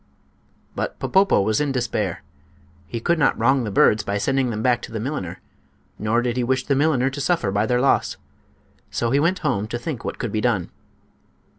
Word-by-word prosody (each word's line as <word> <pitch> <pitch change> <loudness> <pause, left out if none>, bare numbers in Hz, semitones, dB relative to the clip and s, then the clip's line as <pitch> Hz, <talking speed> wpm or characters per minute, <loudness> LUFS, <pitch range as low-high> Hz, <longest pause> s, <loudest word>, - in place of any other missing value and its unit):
But - - -3
Popopo 195 - +3
was 110 +6 +1
in 145 -2 0
despair. 110 -8 -2 0.6
He 115 - -4
could 170 +8 +1
not 135 - +3
wrong 130 +3 +3
the - - -2
birds 105 +1 +4
by 100 - -2
sending 135 +4 +1
them 110 -1 -3
back 125 -2 +2
to - - -9
the 110 - -4
milliner, 115 - -4 0.6
nor 115 +3 +1
did 120 0 -1
he 125 - +1
wish 130 +1 0
the 140 - +1
milliner 135 -2 +2
to 140 +1 -5
suffer 150 - +1
by 100 +2 +1
their 125 +1 +2
loss. 135 +2 +2 0.7
So 115 -1 -1
he 140 - +3
went 170 +5 +2
home 110 -8 0
to 120 - -3
think 125 +1 -5
what - - -4
could 120 - -3
be 110 - -1
done. 105 -7 0
125 Hz, 200 wpm, -22 LUFS, 110-135 Hz, 0.7 s, birds